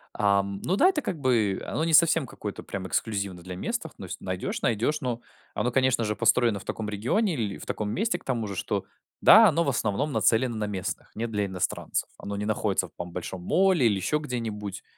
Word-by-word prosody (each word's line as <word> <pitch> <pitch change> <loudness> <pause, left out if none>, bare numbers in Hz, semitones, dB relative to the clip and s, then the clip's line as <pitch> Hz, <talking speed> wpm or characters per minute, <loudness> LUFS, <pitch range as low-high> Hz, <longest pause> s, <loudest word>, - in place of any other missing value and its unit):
Ам, 100 -1 +1
ну 185 - +1
да, 355 - +5
это 320 -6 0
как 170 - -4
бы, 115 -8 +2
оно 155 - -2
не 165 - 0
совсем 160 -2 +5
какое-то 105 -3 -6
прямо 95 -1 -5
эксклюзивно 100 -4 -2
для 90 +1 -7
местных, 90 - -4
ну - - -8
если - - -8
найдешь- - - -3
найдешь, 120 +7 +1
но 120 -3 -2 0.3
оно 125 - 0
конечно 130 -1 +2
же 105 -1 -1
построено 115 -4 +3
в 95 - -13
таком 110 - -4
регионе, 130 - 0
или 110 -8 -2
в - - -10
таком 105 -1 -3
месте 195 - 0
к - - -23
тому 120 -4 -1
же, 100 - -5
что - - -2 0.4
да, 220 +2 +9
оно 170 -2 +2
в 140 - 0
основном 125 +3 0
нацелено 120 -2 +2
на 105 -1 -2
местных, 95 -3 -4
не 115 +2 -2
для 105 -3 -1
иностранцев, 95 -2 -2
оно 100 - -5
не 105 +1 -3
находится 105 -3 0
в, - - -25
там, 90 0 -6
большом 90 +1 -6
молле 180 - +3
или 105 - +2
еще 150 +10 0
где-нибудь, 110 -8 -5
110 Hz, 215 wpm, -27 LUFS, 100-140 Hz, 0.4 s, да